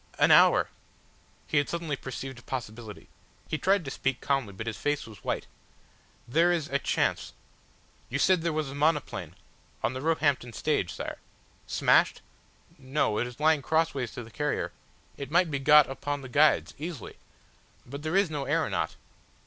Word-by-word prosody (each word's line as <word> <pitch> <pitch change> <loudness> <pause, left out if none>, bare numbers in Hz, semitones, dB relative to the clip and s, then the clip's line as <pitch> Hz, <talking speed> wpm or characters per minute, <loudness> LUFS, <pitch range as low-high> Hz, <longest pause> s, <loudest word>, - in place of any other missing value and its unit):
An - - +4
hour!" - - +6 0.8
He 155 - +2
had 145 - -1
suddenly 165 -4 -2
perceived 130 -1 -7
a - - -14
possibility. 115 -3 -7 0.4
He 155 - -2
tried 195 -2 +2
to 135 - -4
speak 135 -1 -1
calmly, 135 -7 0
but 100 +3 -7
his 115 -2 -3
face 145 0 -1
was 110 -4 -13
white. - - -2 0.8
"There 165 +8 +3
is 165 -4 0
are 140 - +1
chance. - - 0 0.8
You 135 - -1
said 180 +4 +3
there 170 0 0
was 155 -3 -2
a - - -7
monoplane 145 - 0 0.2
?" - - -32
"On - - +1
the 130 - -5
Roehampton 145 -6 +1
stage, 90 - 0
Sire." - - -6 0.5
"Smashed?" - - +3 0.6
"No. 130 -5 0
It 120 - 0
is 125 +1 -11
lying 155 -1 +4
crossways 140 -5 0
to 120 - -6
the 115 - -13
carrier. 150 +5 -2 0.5
It 140 -2 -6
might 170 +1 +3
be 140 - -1
got 150 +1 +7
upon 145 +1 -4
the 130 - -9
guides 150 +4 +3
easily. 155 - -6 0.7
But 140 +3 -8
there 155 +3 -2
is 195 -4 +3
no 145 -2 -3
aeronaut - - 0
140 Hz, 175 wpm, -28 LUFS, 125-155 Hz, 0.8 s, got